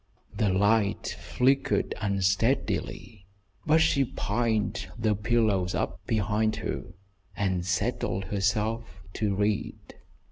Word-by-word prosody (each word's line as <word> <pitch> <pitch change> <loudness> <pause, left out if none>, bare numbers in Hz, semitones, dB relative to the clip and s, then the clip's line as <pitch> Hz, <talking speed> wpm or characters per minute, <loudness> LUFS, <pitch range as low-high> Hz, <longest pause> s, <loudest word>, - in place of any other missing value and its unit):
The 105 - +1
light 100 +2 +2
flickered 135 +2 +1
unsteadily, 100 +1 0 0.4
but 160 +1 +5
she 140 -3 +3
piled 110 -2 -1
the 110 -1 +2
pillows 105 -4 +1
up - - -3
behind 110 0 +1
her 85 - -5 0.4
and 95 -3 0
settled 95 0 -1
herself 105 +3 0 0.3
to 105 -3 0
read. 105 +1 0
105 Hz, 100 wpm, -27 LUFS, 100-115 Hz, 0.4 s, but